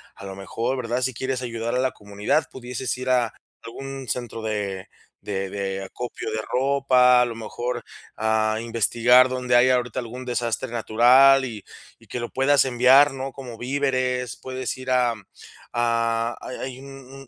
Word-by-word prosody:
a - - -11
lo 95 0 -7
mejor, 115 +7 -3
¿verdad? 120 0 -2
Si 130 0 -1
quieres 130 +1 -2
ayudar 115 -1 -3
a - - +1
la 130 0 +1
comunidad, 105 +9 -1
pudieses 125 -1 -4
ir 130 0 -4
a 125 -3 +2 0.3
algún 135 +2 -8
centro 120 -2 -4
de, 100 -3 -3 0.3
de 95 -1 -3
de 95 -1 -4
acopio 115 +3 -6
de 110 - -2
ropa, 130 -1 +3
a - - +4
lo 120 -1 -5
mejor 115 +2 -4 0.3
a 110 0 +1
investigar 120 +2 +4
donde 125 -1 0
haya 125 +1 +5
ahorita 125 0 -2
algún 125 +1 -7
desastre 120 0 -2
natural 125 +4 +5
y 110 -5 -7 0.4
y - - -21
que 125 - -5
lo 120 - -4
puedas 135 +1 +3
enviar, 130 +3 +5
¿no? 135 0 -5
Como 125 -4 -9
víveres, 130 -1 -1
puedes 130 0 -5
ir 130 0 -5
a 125 -2 +2 0.6
a 115 0 0
hay - - -7
hay 130 -1 -6
un 135 0 -12
125 Hz, 165 wpm, -23 LUFS, 115-130 Hz, 0.6 s, haya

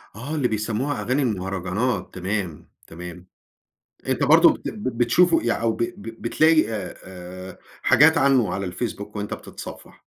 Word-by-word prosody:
آه، 140 +8 -5
اللي 135 -5 +1
بيسَموها 110 +6 -2
أغاني 130 +4 0
المهرجانات 95 +1 -2
تمام، 95 -3 -4 0.2
تمام 90 +1 -9 0.8
أنت - - 0
برضه - - +7
بت - - -6
ب 115 +2 -4
بتشوفه 165 +9 +4
يع 115 -1 0
أو 115 -1 +2
ب - - -9
ب 115 0 -7
بتلاقي 155 +6 +3
آآ 100 -4 -5
آآ 90 0 -10 0.2
حاجات 150 +5 +6
عنّه 130 -4 +3
على 95 -2 -3
الfacebook 105 -1 -5
وأنت 105 0 -3
بتتصفح؟ - - -10
110 Hz, 145 wpm, -23 LUFS, 95-130 Hz, 0.8 s, برضه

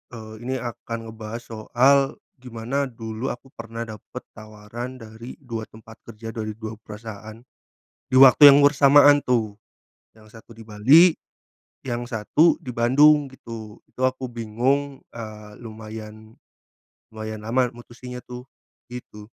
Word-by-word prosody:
eee, 110 -1 -10
ini 130 +3 -4
akan 115 -2 -6
ngebahas 110 +1 -8
soal 130 +5 +2 0.2
gimana 125 +3 -3
dulu 115 0 -6
aku 130 +2 -15
pernah 115 -1 -7
dapet 110 +3 -10
tawaran 110 +3 -9
dari 115 +2 -10
2 115 -4 -6
tempat 110 0 -15
kerja 115 0 -9
dari 110 -1 -5
2 110 0 -8
perusahaan 110 0 -10 0.8
di 130 - +1
waktu 135 +2 +9
yang 140 - +6
bersamaan 145 0 +6
tuh, 115 -4 0 0.6
yang 110 - -18
satu 115 +1 -16
di 115 -1 -14
Bali 135 +12 +6 0.7
yang 120 -2 -4
satu 125 +7 +2
di 140 -7 -7
Bandung 145 +5 +4
gitu. 115 -4 -10
Itu 130 - -6
aku 130 -1 -5
bingung, 125 +5 -2
eee, 110 -2 -9
lumayan, 110 -1 -10 0.8
lumayan 110 0 -6
lama 125 +2 +1
mutusinnya 120 +1 -10
tuh, 125 +1 -10 0.4
gitu. 105 -4 -10
115 Hz, 130 wpm, -23 LUFS, 110-130 Hz, 0.8 s, waktu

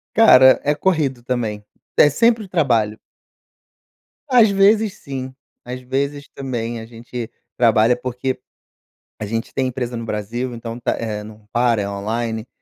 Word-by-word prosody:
Cara, 130 - +7
é 150 +1 +1
corrido 145 -8 0
também. 115 -4 -3 0.3
É 145 - +6
sempre 230 +7 +2
o - - -13
trabalho. 115 - +1 1.3
Às 240 -5 +6
vezes 200 +1 +3
sim, 130 -2 -6 0.3
às 125 +1 -6
vezes 140 +3 -3
também 120 -4 -4
a 110 - -9
gente 120 0 -7 0.3
trabalha, 115 0 +4
porque 125 +1 -3 0.8
a 105 - -3
gente 115 +2 -4
tem 130 -1 0
empresa 125 -1 -4
no 115 0 -5
Brasil, 115 +4 -3
então 115 0 -7
tá - - -1 0.3
não 105 0 -13
para, 120 -3 +2
é 100 - -3
online, 110 +3 -3
125 Hz, 145 wpm, -20 LUFS, 115-140 Hz, 1.3 s, Cara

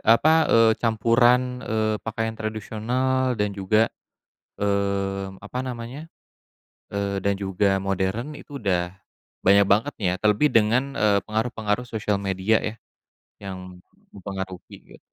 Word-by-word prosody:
apa, 160 +5 +4
eee, 115 -1 +5
campuran, 120 +2 +3
eee, 110 0 +1
pakaian 115 0 -3
tradisional 120 +4 -1
dan 105 -2 0
juga, 100 +3 +1 0.7
mmm, 100 -1 -1
apa 105 +5 -6
namanya, 130 +5 -7 0.8
eee, 100 -1 -2
dan 100 +1 +1
juga 95 0 +1
modern 95 +8 -2
itu 145 -1 -9
udah 90 -4 -1 0.5
banyak 100 +1 +7
banget 115 +8 +1
ya, 90 -2 +2
terlebih 105 +9 +3
dengan, 125 +5 +2
eee, 100 -4 +3
pengaruh-pengaruh 110 +1 -2
sosial 105 -3 -1
media 95 +2 +1
ya 110 - -4 0.7
yang 90 -2 -8 0.3
mempengaruhi 95 -1 -7
gitu. - - -16
105 Hz, 120 wpm, -24 LUFS, 100-120 Hz, 0.8 s, banyak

